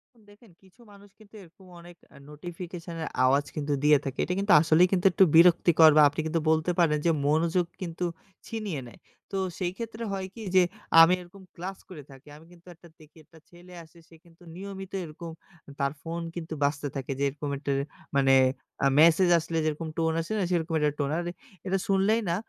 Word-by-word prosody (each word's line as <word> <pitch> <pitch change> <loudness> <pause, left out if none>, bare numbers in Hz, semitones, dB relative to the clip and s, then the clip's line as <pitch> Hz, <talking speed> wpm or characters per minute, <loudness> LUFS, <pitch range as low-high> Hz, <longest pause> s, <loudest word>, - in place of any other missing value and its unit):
এখন 215 -3 -25
দেখেন 210 -2 -21
কিছু 190 +6 -23
মানুষ 200 0 -17
কিন্তু 215 0 -19
এরকম 180 +3 -20
অনেক 175 0 -14 0.2
আ - - -14
নোটিফিকেশন 170 +1 -9
এর - - -4 0.2
আওয়াজ 140 +2 +2
কিন্তু 145 -1 -2
দিয়ে 150 -1 +6
থাকে। 135 -1 -5
এইটা 180 - -2
কিন্তু 200 0 +2
আসলেই 165 +3 +4
কিন্তু 180 0 0
একটু 190 - +4
বিরক্তিকর 165 -2 +6
বা - - +8
আপনি 145 - -8
কিন্তু 165 0 -1
বলতে 160 +2 +1
পারেন 155 -3 +3
যে 165 - +4 0.2
মনোযোগ 165 +3 +1 0.2
কিন্তু 175 0 -4 0.4
ছিনিয়ে 205 -11 -5
নেয়। - - -15 0.3
তো 195 - -3 0.2
সেই 180 -2 -2
ক্ষেত্রে 230 0 -7
হয় 190 -1 -4
কি 230 - -11
যে 185 - +7 0.4
আমি 170 +2 +6
এইরকম 190 +2 -15
ক্লাস 185 +3 -7
করে 155 -6 -10
থাকি। 135 +2 -17
আমি 160 - -17
কিন্তু 175 0 -20
একটা 170 +1 -18
দেখি 155 +1 -19
একটা 160 - -20
ছেলে 175 +1 -16
আসে, 160 +2 -21
সে 165 - -17
কিন্তু 170 +1 -21
নিয়মিত 195 0 -8
এইরকম 165 +1 -9 0.4
আ - - -12
তার 140 0 0
ফোন 170 +1 -5
কিন্তু 165 -2 -6
বাজতে 145 0 -1
থাকে 135 0 -5
যে - - 0
এইরকম 145 +1 -5
একটা 140 0 -4 0.4
মানে 135 -1 +4 0.5
আ - - +6
মেসেজ 170 +3 +5
আসলে 165 +1 -4
যেরকম 155 +1 -3
টোন 160 0 +1
আসে 165 - -8
না? - - 0
সেরকম 165 -1 -1
একটা 150 -1 +1
টোন। 140 -1 -1
আর 175 - -2 0.4
এটা 195 +1 +1
শুনলেই 200 +4 +2
না 170 - +1
170 Hz, 205 wpm, -27 LUFS, 155-185 Hz, 0.5 s, বা